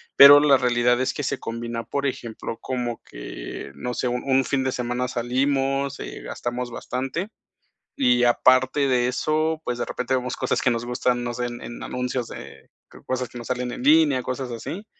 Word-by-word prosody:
pero 140 +1 +11
la 145 -2 +5
realidad 120 0 +2
es 130 - 0
que 145 - -4
se - - -1
combina, 115 0 -4
por 140 0 -3
ejemplo, 115 -3 -5
como 120 -2 -3
que - - -8
no 125 +12 -4
sé, 125 - -1
un 125 0 -2
un 135 -1 +2
fin 135 -2 0
de 130 - 0
semana 125 +1 -2
salimos, 135 +3 0
eh, - - -7
gastamos 120 0 -4
bastante. 135 - -3 0.7
Y 120 -1 +4
aparte 130 +3 +4
de 125 -1 +2
eso, 155 +4 0
pues, 125 -1 -2
de - - -1
repente 130 +1 -2
vemos 125 -1 -1
cosas - - 0
que 125 - +3
nos 115 0 -1
gustan, 125 0 0
no 120 -1 -3
sé, 125 0 -2
en 120 0 -7
en 120 - -8
anuncios 125 -1 -3
de 70 - -11 0.2
creo - - -16
cosas 130 -1 -2
que 120 - -14
nos 120 - -7
salen 125 -1 -2
en - - -6
línea, 145 -2 +5
cosas 130 0 -4
así. 170 - -6
125 Hz, 195 wpm, -24 LUFS, 120-135 Hz, 0.7 s, pero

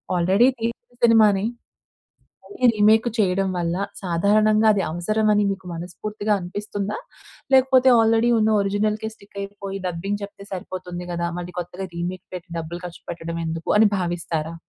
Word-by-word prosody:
Already 190 +7 +4
తీసిన 235 +1 -4
సినిమా‌నే, 215 -4 +5 1.0
మళ్ళి 325 -11 0
రీమేక్ 215 +2 +4
చేయడం 195 -1 +2
వల్ల 170 0 -1 0.3
సాధారణంగా 215 +5 +3
అది 200 -2 0
అవసరం 215 +6 0
అని 210 0 +3
మీకు 190 -1 -9
మనస్ఫూర్తిగా 205 +5 -4
అనిపిస్తుందా? 205 +2 -4 0.6
లేకపోతే 260 0 +5
ఆల్రెడీ 225 +1 +3
ఉన్న 220 0 +3
ఒరిజినల్‌కే 210 +2 -1
స్టిక్ 200 -2 -14
అయిపోయి 200 -1 -6
డబ్బింగ్ 190 +4 -3
చెప్తే 200 0 -11
సరిపోతుంది 180 -1 -6
కదా, 170 0 -1
మళ్ళీ 175 0 -7
కొత్తగా 180 +2 -6
రీమేక్ 175 +1 -4
పెట్టి 180 +1 -7
డబ్బులు 165 +2 -6
ఖర్చు 170 - -11
పెట్టడం 170 0 -5
ఎందుకు? 160 0 -4
అని 220 0 +6
భావిస్తారా? 170 -2 -3
195 Hz, 140 wpm, -23 LUFS, 175-215 Hz, 1.0 s, అని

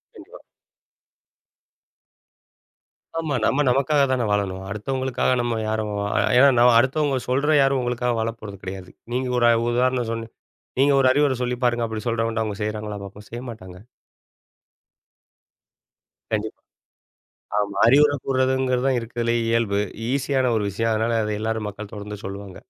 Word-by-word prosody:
கண்டிப்பா. - - -13 2.8
ஆமா. 155 -4 -2
நம்ம 145 +2 +2
நமக்காக 140 +3 +3
தானே 125 -2 +1
வாழணும்! 95 -2 -1
அடுத்தவங்களுக்காக 130 +6 -1
நம்ம 120 -1 -1
யாரும் 110 -1 -2 0.2
அ - - +3 0.2
யா 135 - +7
நா 120 - +6
அடுத்தவுங்க 135 +3 +2
சொல்ற 145 +4 +2
யாரும் 135 0 +2
உங்களுக்காக 125 0 -1
வாழப்போறது 110 -3 -5
கிடையாது. 95 -1 -7 0.2
நீங்க 130 +1 -1
ஒரு 120 -1 +5 0.2
உதாரணம் 125 -1 +1
சொல்லு 115 0 -4 0.5
நீங்க 140 +2 +4
ஒரு 135 - +3
அறிவுரை 145 -1 +2
சொல்லி 125 0 -1
பாருங்க, 120 -1 +2
அப்புடி 110 -1 -5
சொல்றவங்ட்ட. 115 -1 0
அவுங்க 105 -2 -5
செய்கிறாங்களா 105 0 -3
பார்ப்போம். 100 +1 -11
செய்ய 120 - -6
மாட்டாங்க. 95 -4 -11 2.5
கண்டிப்பா. 110 0 -2 1.0
ஆமா. 100 -1 -2
அறிவுரை 145 +3 +5
கூர்றதுங்கிறதுதான் 130 -1 +1
இருக்கிறதுலேயே 115 0 -1
இயல்பு 115 -3 +1 0.3
ஈஸியான 135 -1 +1
ஒரு 105 - 0
விஷயம். 115 +3 -1
அதனால 115 +1 0
அத 105 - -2
எல்லாரும். 110 -1 -2
மக்கள் 105 +1 -9
தொடர்ந்து 105 0 -7
சொல்லுவாங்க. 100 -1 -7
115 Hz, 130 wpm, -23 LUFS, 105-130 Hz, 2.8 s, யா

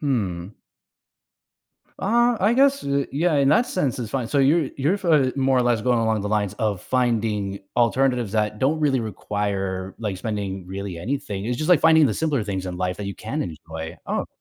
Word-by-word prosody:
Hmm. 100 - -2 1.4
Uh, 240 +3 +2
I 205 +4 +3
guess, 275 +2 +3
eh, 140 0 0
yeah, 160 +3 +1
in 140 -1 +3
that 155 +11 +4
sense, 145 - -1
it's 115 -3 -4
fine. 130 -4 -2
So 145 - +1
you're 145 +2 +3
you're 155 +9 +1
fi 150 -8 +3
more 135 -1 +2
or 125 - +4
less 120 -2 +2
going 120 +2 +2
along 110 -1 +1
the 105 - -3
lines 105 -2 0
of 105 -4 -2
finding 110 -6 0 0.2
alternatives 120 -2 +1
that 105 -1 0
don't 145 +6 +1
really 140 -4 +2
require, 100 -3 -3
like, 105 -5 -3
spending 95 -3 -4
really 95 -2 -6
anything- 105 -2 -4
it's 120 +1 -1
just 155 +7 -1
like 170 -5 +6
finding 160 -1 +6
the 120 - +2
simpler 145 -2 0
things 95 -2 -3
in 90 -1 -5
life 90 +1 -2
that 105 - -4
you 100 - -4
can 135 +8 -4
enjoy. 80 0 -7
Oh, - - -1
okay. - - -5
115 Hz, 200 wpm, -23 LUFS, 100-140 Hz, 1.4 s, like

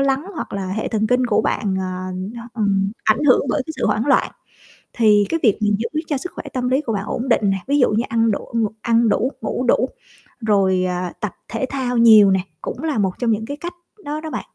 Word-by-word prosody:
lắng 275 +3 +1
hoặc - - -6
là 195 -1 -3
hệ 220 - -2
thần 220 -1 0
kinh 250 +1 +2
của 225 - +2
bạn, 195 -3 -1
à, 185 0 -4 0.5
ừm, 200 -3 +1
ảnh 220 +7 +2
hưởng 255 - +5
bởi 275 - 0
cái 315 - -5
sự - - 0
hoảng 215 +4 0
loạn. 280 - +3 0.6
Thì 210 -3 +4
cái 330 - 0
việc 215 -5 +4
mình 210 -1 +2
giữ 305 +7 -2
cho 290 - 0
sức 360 +7 -6
khỏe - - -7
tâm 250 -1 -1
lý 265 +3 +2
của 230 -6 -3
bạn 200 -1 -2
ổn 245 +4 -3
định 215 -4 +3
nè, 195 - +1
ví 285 +1 +2
dụ 250 - +4
như 220 +3 +1
ăn 230 -1 +2
đủ, - - -4
ng 225 -2 +2
ăn 230 -1 +3
đủ, 255 +6 +1
ngủ 255 - -2
đủ, 250 +2 +3 0.5
rồi, 195 -4 +2
à, 180 0 -3
tập 210 -4 -3
thể 235 +3 -2
thao 255 -3 -2
nhiều 220 -4 +7
nè, 190 - +3 0.2
cũng 260 - -6
là 310 -6 -1
một 195 -3 +1
trong 235 -2 +1
những 220 +1 -1
cái 285 +5 -6
cách 345 +3 -6 0.3
đó 300 +1 -3
đó 315 - -6
bạn. - - -3
230 Hz, 245 wpm, -20 LUFS, 205-260 Hz, 0.6 s, nhiều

